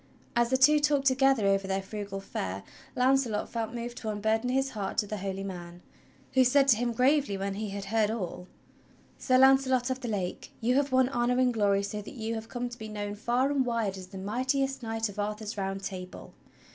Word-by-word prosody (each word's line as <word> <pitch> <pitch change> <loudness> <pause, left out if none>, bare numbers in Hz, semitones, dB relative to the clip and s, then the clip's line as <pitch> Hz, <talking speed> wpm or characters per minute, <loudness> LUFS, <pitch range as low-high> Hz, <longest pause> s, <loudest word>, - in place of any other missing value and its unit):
As 235 0 +3
the 260 - +3
two 295 +3 +6
talked 290 -2 +2
together 270 -4 +4
over 195 0 +2
their 195 0 0
frugal 200 -1 -5
fare, 95 - -5 0.3
Launcelot 250 -4 +2
felt 225 -1 -3
moved 240 +1 -5
to 220 - -4
unburden 220 +3 0
his 270 +1 +1
heart 200 -2 -4
to - - +2
the 210 +1 -4
holy 195 0 -4
man, 175 -2 -8 0.5
who 260 - +5
said 275 +2 +4
to 235 - +7
him 240 +1 0
gravely 255 -2 +2
when 195 0 -2
he 210 +1 -4
had 200 0 -5
heard 215 +1 +1
all: 180 -5 -4 0.7
"Sir 255 -1 +3
Launcelot 265 -1 +4
of 260 - -2
the 250 - -5
Lake, 195 -5 -3
you 240 +2 +1
have 280 +1 +1
won 260 -1 +4
honor 245 -1 +1
and 255 -1 +3
glory 200 -2 +2
so 210 +1 -4
that 210 - -10
you 225 -1 -3
have 220 0 -6
come 245 0 -3
to 240 0 -10
be 220 0 -7
known 205 -1 -4
far 240 +6 0
and 280 -2 +2
wide 230 -5 -1
as 185 -1 -9
the 190 - -10
mightiest 265 +7 -1
knight 225 -1 -2
of 205 0 -9
Arthur's 210 +1 -3
Round 195 -1 -3
Table. 185 -1 -7
225 Hz, 215 wpm, -29 LUFS, 200-255 Hz, 0.7 s, to